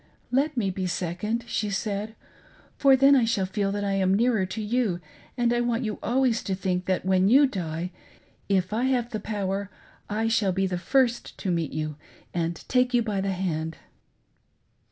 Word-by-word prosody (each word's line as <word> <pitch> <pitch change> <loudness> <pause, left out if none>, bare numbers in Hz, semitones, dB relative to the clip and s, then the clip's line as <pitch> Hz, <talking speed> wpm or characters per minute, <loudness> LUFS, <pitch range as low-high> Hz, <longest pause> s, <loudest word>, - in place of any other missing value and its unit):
"Let 275 +2 +1
me 200 -5 +1
be 185 0 -3
second," 180 +7 -2
she 210 - -1
said, 205 +2 -3 0.6
"for 275 -1 +5
then 275 +2 +6
I 255 - +4
shall 225 -4 +1
feel 195 +1 -1
that 205 0 -2
I 200 - 0
am 195 -1 +2
nearer 225 -3 +2
to 210 - -5
you, 215 -4 0 0.4
and 240 -1 +2
I 240 - +1
want 240 0 0
you 215 -2 -3
always 245 0 +1
to 195 - -1
think 185 -1 -1
that, 185 -1 0
when 190 0 +3
you 275 +5 +7
die, 175 - -3 0.6
if 190 0 +1
I 235 +4 +1
have, 245 -2 0
the 215 - -2
power, 200 -1 -3 0.4
I. 220 +2 0
shall 210 -4 +2
be 195 +1 +1
the 180 -2 -2
first 245 +3 +1
to 190 - -2
meet 165 -3 -1
you 155 -1 -3 0.4
and 170 -1 -1
take 250 -1 +2
you 240 - +3
by 205 -3 -1
the 195 0 -1
hand." 160 -4 -2
205 Hz, 190 wpm, -26 LUFS, 185-235 Hz, 0.6 s, you